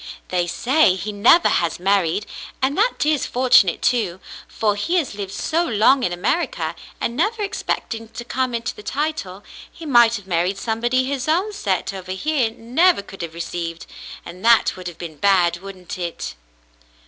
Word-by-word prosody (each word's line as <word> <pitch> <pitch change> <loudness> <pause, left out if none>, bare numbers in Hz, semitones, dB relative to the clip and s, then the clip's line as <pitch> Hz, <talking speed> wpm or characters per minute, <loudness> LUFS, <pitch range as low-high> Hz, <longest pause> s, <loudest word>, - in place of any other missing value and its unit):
"They 175 -1 0
say 255 - +3
he 195 +3 -4
never 220 +12 +5
has 170 -1 0
married, 195 0 +1 0.3
and 265 +2 0
that 445 -5 +1
is 300 -2 +1
fortunate 245 -8 +3
too; 205 -8 +1 0.3
for 210 -2 0
he 330 - -1
has 320 -11 0
lived 200 -2 -6
so 325 - 0
long 245 0 +3
in 180 - 0
America, 330 - -1 0.3
and 235 - -2
never 415 - 0
expecting 225 - -3
to 240 - -8
come 255 0 -1
into 235 +1 -3
the - - -12
title, 255 -7 -3 0.3
he 330 - -11
might 240 -5 +5
have 205 -4 -7
married 180 +1 0
somebody 240 +4 0
his 270 0 -3
own 365 +7 +1
set 195 - -2
over 185 -1 -6
here 270 +3 0
never 245 - +2
could 195 -1 -11
have 165 -1 -6
received, 170 0 -5 0.4
and 180 +3 -10
that 230 -1 +4
would 185 -1 -8
have 175 - -8
been 165 -3 -8
bad, 180 -2 +3
wouldn't 185 -1 -9
it. 170 - -4
215 Hz, 170 wpm, -21 LUFS, 185-265 Hz, 0.4 s, never